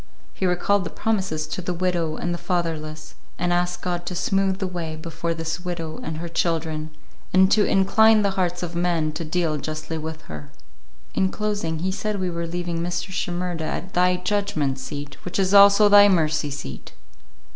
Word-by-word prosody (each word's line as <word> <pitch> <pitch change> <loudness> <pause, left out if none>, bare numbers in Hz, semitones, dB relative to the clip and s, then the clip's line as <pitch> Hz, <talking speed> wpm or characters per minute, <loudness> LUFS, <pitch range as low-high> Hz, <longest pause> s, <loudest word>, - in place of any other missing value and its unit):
He 190 - -1
recalled 185 +3 +2
the 165 - -4
promises 190 -8 -1
to 155 +4 -4
the 180 0 -3
widow 170 -3 0
and 175 +2 -2
the 175 - -4
fatherless, 155 -4 -3 0.2
and 175 0 0
asked 175 0 -1
God 175 -1 -3
to 180 - -3
smooth 195 +1 +1
the 195 - -2
way 170 -4 -4
before 165 +1 -4
this 165 +1 -3
widow 170 -3 -5
and 160 0 -5
her 170 +2 -5
children, 160 -2 -1 0.4
and 190 +1 +5
to 210 -1 +5
"incline 215 +3 +4
the 200 - +2
hearts 180 -2 -1
of 170 -1 -5
men 170 -3 +1
to 155 +2 -5
deal 160 -1 0
justly 155 +2 -4
with 160 0 -6
her." 75 -2 -9 0.6
In 190 - +2
closing, 205 -6 -2
he 190 - +1
said 210 +1 -2
we 185 -1 -1
were 170 0 -3
leaving 175 0 -3
Mr. 175 +2 -3
Shimerda 175 -3 -2
at 185 +3 -4
"Thy 180 +1 +3
judgment 180 -8 -1
seat, 145 +1 -7
which 180 - -4
is 195 0 +1
also 200 +1 +8
Thy 205 0 +8
mercy 155 -4 +2
seat." 140 - -7
175 Hz, 185 wpm, -23 LUFS, 160-190 Hz, 0.6 s, also